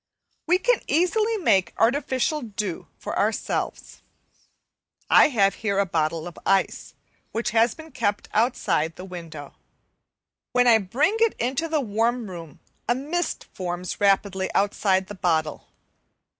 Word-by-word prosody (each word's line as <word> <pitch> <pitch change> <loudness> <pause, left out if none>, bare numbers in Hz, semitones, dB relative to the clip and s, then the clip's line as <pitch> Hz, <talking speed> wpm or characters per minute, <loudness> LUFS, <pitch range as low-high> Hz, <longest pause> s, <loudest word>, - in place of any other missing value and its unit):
We 360 +2 +4
can - - +1
easily 430 +7 +2
make 195 - +2
artificial 265 +4 +1
dew 210 -6 -5
for - - -4
ourselves. - - -2 1.1
I - - +8
have 200 -9 +2
here 200 -3 0
a 200 - +3
bottle 160 -2 -1
of 175 - -10
ice 195 -1 0 0.4
which 230 +1 -1
has 230 +1 +3
been 320 0 -12
kept 205 -4 -1
outside 195 -8 +1
the 185 - -9
window. 165 -6 -9 1.0
When 250 0 +4
I 230 -2 +6
bring 275 - +1
it 460 -1 +3
into 265 +7 -1
the 315 -2 0
warm 230 -1 -1
room 165 -4 -10 0.3
a 240 - +4
mist 310 +7 -3
forms 180 +1 -4
rapidly 195 -1 +2
outside 195 -1 +2
the 205 - -9
bottle. 160 -5 -1
215 Hz, 135 wpm, -24 LUFS, 185-265 Hz, 1.1 s, I